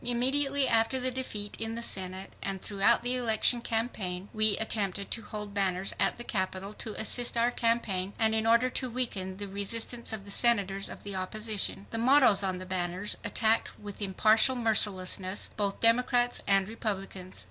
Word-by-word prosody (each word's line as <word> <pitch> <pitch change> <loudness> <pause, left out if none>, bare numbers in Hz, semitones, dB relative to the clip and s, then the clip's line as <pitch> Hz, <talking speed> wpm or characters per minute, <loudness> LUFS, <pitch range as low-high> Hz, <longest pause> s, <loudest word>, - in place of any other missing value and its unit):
Immediately 270 +3 +1
after 225 +3 +2
the 255 0 0
defeat 215 -5 -4
in 225 0 -3
the 235 - -4
Senate, 190 -2 -2
and 195 -1 -4
throughout 200 +3 +2
the 245 +1 0
election 240 0 +1
campaign, 205 -6 -3
we 215 -2 +4
attempted 200 -3 -1
to 230 - -1
hold 210 -1 -7
banners 190 -1 0
at - - +1
the 240 - -7
Capitol 190 -1 -3
to 215 0 -6
assist 240 +2 +4
our 235 +1 +2
campaign 215 -6 -1
and 220 0 +2
in 220 0 0
order 235 +2 +4
to 255 0 -2
weaken 205 -7 -3
the 205 0 -5
resistance 225 +4 -2
of 215 -3 -4
the 200 - -9
senators 200 -4 +1
of - - -10
the 200 - -6
opposition. 205 +1 -2
The 225 - -3
mottoes 250 -4 +5
on 190 -2 -1
the 185 - -8
banners 185 +2 -2
attacked 220 0 0
with 205 0 -9
impartial 215 +6 +3
mercilessness 200 -4 0
both 200 -2 -1
Democrats 245 +1 +3
and 195 -1 +3
Republicans. 195 - -5
215 Hz, 170 wpm, -29 LUFS, 195-235 Hz, -, mottoes